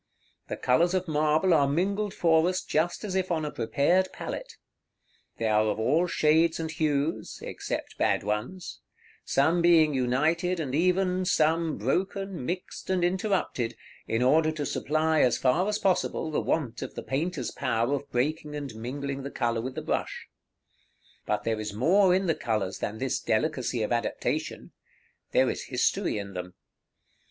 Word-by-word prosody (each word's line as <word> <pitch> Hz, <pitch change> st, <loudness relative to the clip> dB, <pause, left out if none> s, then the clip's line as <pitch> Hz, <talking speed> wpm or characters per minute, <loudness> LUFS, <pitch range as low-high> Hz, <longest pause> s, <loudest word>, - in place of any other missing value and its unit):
The -, -, -4 dB
colors 170 Hz, +9 st, +2 dB
of 185 Hz, 0 st, -1 dB
marble 155 Hz, +3 st, +2 dB
are 145 Hz, -3 st, +4 dB
mingled 200 Hz, +7 st, 0 dB
for 165 Hz, -1 st, +3 dB
us 185 Hz, 0 st, -2 dB
just 170 Hz, +6 st, -1 dB
as 205 Hz, -3 st, -4 dB
if 190 Hz, -1 st, 0 dB
on 160 Hz, -3 st, 0 dB
a 150 Hz, -, -3 dB
prepared 170 Hz, +11 st, +1 dB
palette. -, -, -6 dB, 0.8 s
They 115 Hz, -, -2 dB
are 110 Hz, 0 st, +3 dB
of 105 Hz, 0 st, -1 dB
all 160 Hz, +10 st, +2 dB
shades 160 Hz, 0 st, +3 dB
and 160 Hz, -1 st, -3 dB
hues 150 Hz, 0 st, -1 dB
(except -, -, -5 dB
bad -, -, +2 dB
ones), 105 Hz, -, -4 dB, 0.5 s
some 160 Hz, +6 st, +2 dB
being 165 Hz, -3 st, +5 dB
united 155 Hz, +8 st, +1 dB
and 140 Hz, -5 st, -3 dB
even, 180 Hz, +3 st, +2 dB
some 160 Hz, -1 st, +2 dB
broken, 185 Hz, -, -2 dB
mixed, 180 Hz, +2 st, -5 dB
and 185 Hz, -2 st, +1 dB
interrupted, 180 Hz, -, 0 dB, 0.3 s
in 115 Hz, +2 st, 0 dB
order 155 Hz, +5 st, +4 dB
to 150 Hz, -2 st, -3 dB
supply, 155 Hz, +2 st, +1 dB
as 125 Hz, -, +3 dB
far 175 Hz, +10 st, +2 dB
as 210 Hz, -, 0 dB
possible, 185 Hz, -4 st, 0 dB
the -, -, 0 dB
want 135 Hz, -8 st, -1 dB
of -, -, -6 dB
the -, -, -5 dB
painter's 140 Hz, +3 st, -2 dB
power 120 Hz, 0 st, 0 dB
of 140 Hz, 0 st, -3 dB
breaking 150 Hz, +4 st, -1 dB
and 140 Hz, -5 st, -5 dB
mingling 135 Hz, +5 st, -5 dB
the 140 Hz, -, -5 dB
color 120 Hz, -4 st, -1 dB
with 130 Hz, +2 st, -5 dB
the -, -, -4 dB
brush. -, -, -2 dB, 1.0 s
But -, -, 0 dB
there 110 Hz, -1 st, -1 dB
is 105 Hz, -1 st, -5 dB
more 180 Hz, -, +4 dB
in 190 Hz, +1 st, +1 dB
the 165 Hz, -, +2 dB
colors 105 Hz, -8 st, -2 dB
than 105 Hz, -, -3 dB
this 130 Hz, +2 st, -1 dB
delicacy 120 Hz, -1 st, 0 dB
of 105 Hz, -, -3 dB
adaptation. 120 Hz, -1 st, -2 dB, 0.6 s
There -, -, +4 dB
is -, -, -6 dB
history -, -, 0 dB
in 100 Hz, -1 st, -6 dB
them. 90 Hz, 0 st, -6 dB
155 Hz, 165 wpm, -27 LUFS, 125-175 Hz, 1.0 s, being